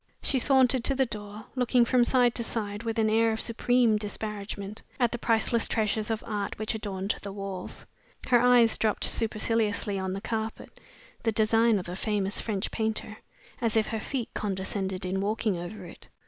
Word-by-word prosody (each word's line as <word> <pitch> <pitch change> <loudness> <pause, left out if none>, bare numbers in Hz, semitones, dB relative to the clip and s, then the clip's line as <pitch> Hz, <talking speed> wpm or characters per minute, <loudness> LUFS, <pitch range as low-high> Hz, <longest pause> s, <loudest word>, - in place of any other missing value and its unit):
She 265 - +2
sauntered 260 -1 +4
to 275 - +1
the 265 0 +3
door, 210 -2 -7
looking 250 -1 +3
from 245 0 +3
side 245 -1 +3
to 235 - 0
side, 205 -2 -3
with 230 -1 -3
an 220 -1 +3
air 225 +1 +3
of 220 - -3
supreme 235 -1 +2
disparagement, 210 -1 -5 0.2
at 240 -2 +3
the 240 - -3
priceless 230 0 +2
treasures 215 -1 0
of 225 -1 -2
art 205 -2 -3
which 215 0 -2
adorned 200 -2 -2
the 200 - -6
walls. 195 -2 -6 0.4
Her 245 -2 +4
eyes 245 -2 +5
dropped 215 -2 +1
superciliously 215 -2 +1
on 190 0 -2
the 195 - -3
carpet 220 0 -4 0.5
(the 225 - +1
design 225 +1 +3
of 180 - -5
a 175 - -5
famous 205 0 -1
French 210 -2 -2
painter), 220 -1 -3 0.4
as 230 -2 +1
if 220 - +2
her 225 - -2
feet 245 +1 -3
condescended 190 -1 -2
in 190 +1 -1
walking 210 0 0
over 180 +3 -7
it. 170 - -13
220 Hz, 180 wpm, -28 LUFS, 205-230 Hz, 0.5 s, eyes